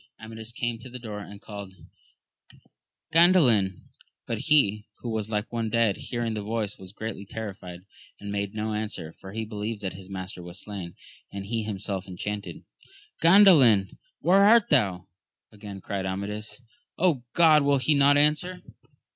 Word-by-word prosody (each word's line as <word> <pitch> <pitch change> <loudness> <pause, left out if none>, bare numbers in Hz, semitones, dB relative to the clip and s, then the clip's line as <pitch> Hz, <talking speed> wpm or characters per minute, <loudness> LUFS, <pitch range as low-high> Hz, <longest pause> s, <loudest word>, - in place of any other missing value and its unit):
Amadis 110 0 -8
came 120 -1 -3
to 130 - -10
the 125 - -7
door 110 -4 -7
and 100 0 -10
called, 100 -2 -9 1.4
Gandalin! 130 - +4 0.4
but - - -3
he, 105 -9 +3
who 120 - -4
was 110 -1 -3
like 105 +1 -3
one 115 -1 -1
dead, 115 -3 +2
hearing 120 -2 -3
the 105 - -3
voice 105 -1 -3
was 95 -1 -10
greatly 110 -1 -6
terrified, 100 -4 -7 0.4
and 100 0 -6
made 100 0 -3
no 110 0 -2
answer, 105 -7 -4
for 95 - -9
he 110 +2 -4
believed 105 0 -5
that 95 -2 -3
his 95 0 -12
master 95 -1 -6
was 90 +2 -9
slain, 95 -5 -7 0.4
and 100 0 -6
he 115 +2 -2
himself 100 -3 -4
enchanted. 100 +2 -6 0.6
Gandalin? 165 - +6 0.2
where 190 +3 +5
art 220 +1 +6
thou? 95 -10 +2 0.5
again 100 -2 -9
cried 95 -1 -3
Amadis. 105 +5 -5 0.7
God! 160 -3 +6
will 140 0 +3
he 140 +3 +2
not 140 0 +5
answer 155 +5 +1
105 Hz, 155 wpm, -26 LUFS, 100-120 Hz, 1.4 s, Gandalin